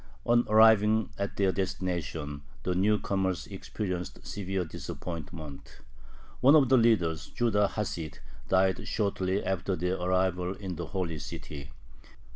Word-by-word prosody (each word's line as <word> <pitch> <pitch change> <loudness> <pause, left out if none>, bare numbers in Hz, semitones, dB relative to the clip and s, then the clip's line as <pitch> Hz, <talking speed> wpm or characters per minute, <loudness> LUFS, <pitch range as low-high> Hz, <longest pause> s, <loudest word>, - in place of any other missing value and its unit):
On 120 0 +4
arriving 110 0 +5
at 100 0 -3
their 95 -2 +3
destination 85 -6 -3 0.2
the 90 - 0
new 100 +4 +3
comers 95 -3 -1
experienced 95 -3 -5
severe 95 -2 -3
disappointment. 80 -4 -7 0.6
One 140 +4 +7
of 140 -5 +5
the 130 - +6
leaders, 85 -9 +2
Judah 105 -4 +1
Hasid, 85 -8 -3 0.3
died 95 0 +2
shortly 95 -2 0
after 95 0 -1
their 90 +2 -1
arrival 90 0 +1
in 95 -3 -5
the 85 -1 -5
Holy 85 -3 -3
City. 70 -1 -7
95 Hz, 125 wpm, -29 LUFS, 85-105 Hz, 0.6 s, One